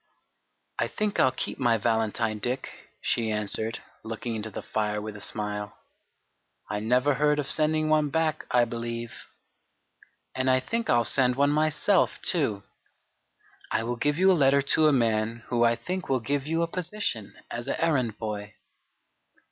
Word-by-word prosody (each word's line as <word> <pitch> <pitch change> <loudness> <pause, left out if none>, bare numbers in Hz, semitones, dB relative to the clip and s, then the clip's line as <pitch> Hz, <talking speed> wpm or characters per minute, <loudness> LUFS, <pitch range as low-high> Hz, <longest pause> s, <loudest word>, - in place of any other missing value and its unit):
"I - - +2
think 210 -1 -2
I'll 130 - +5
keep - - -4
my 120 -3 +3
valentine, 110 0 0
Dick," 125 +5 -3 0.3
she 115 -2 0
answered, 110 +1 0 0.2
looking 115 +1 -5
into 110 0 -4
the 100 - -7
fire 105 -1 -1
with 105 0 -6
a 105 - -9
smile. 105 0 -3 0.9
"I 105 - -1
never 125 +6 +2
heard 150 +2 +2
of 145 - -1
sending 155 +1 +1
one 155 -1 +3
back, 155 0 -1
I 120 -1 +4
believe. 115 0 -5 1.2
And 130 0 0
I 130 0 +4
think 230 - -2
I'll 120 -1 +4
send 125 +1 +3
one 140 +2 +3
myself 155 +5 +2
too. 110 - 0 1.1
I - - 0
will 120 +2 -2
give 145 +5 0
you 190 +2 +5
a - - +6
letter 140 -3 +4
to 155 - +5
a - - +5
man 115 -2 +1
who 120 -1 +2
I 115 0 +4
think 185 +8 -5
will 130 -1 +2
give 140 +4 -2
you 165 +1 +1
a - - 0
position 175 - -3 0.2
as 120 0 -5
an - - 0
errand 130 -10 +1
boy." 105 -2 -5
125 Hz, 165 wpm, -27 LUFS, 110-150 Hz, 1.2 s, a